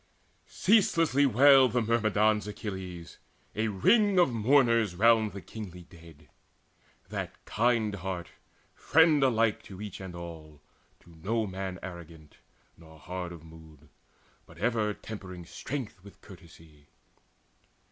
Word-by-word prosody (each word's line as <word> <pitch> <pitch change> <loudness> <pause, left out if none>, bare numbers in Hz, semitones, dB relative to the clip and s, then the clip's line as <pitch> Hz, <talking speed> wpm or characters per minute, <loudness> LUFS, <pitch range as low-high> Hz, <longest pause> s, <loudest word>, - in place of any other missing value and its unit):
Ceaselessly 165 - +3
wailed 135 0 +6
the 125 - +2
Myrmidons 110 -2 +1
Achilles, 95 -5 -7 0.4
A 110 +1 0
ring 200 - +3
of 175 -8 +4
mourners 115 -4 +3
round 110 +1 +4
the 100 0 -8
kingly 90 -5 -9
dead, 80 -3 -17 0.8
That - - -6
kind 115 -2 +1
heart, 90 -2 -5 0.4
friend 160 -1 +3
alike 115 -5 +2
to 95 -2 -11
each 105 -2 -8
and 95 -2 -8
all, 80 -3 -10 0.4
To 85 - -19
no 110 +4 -1
man 95 -1 -5
arrogant 85 -4 -11 0.4
nor 80 -1 -16
hard 90 +1 -6
of 85 -2 -11
mood, 80 -2 -16 0.6
But 80 - -16
ever 110 +1 0
tempering 90 -5 -9
strength 115 - -7
with 100 - -15
courtesy. 80 -5 -17
100 Hz, 120 wpm, -28 LUFS, 85-115 Hz, 0.8 s, wailed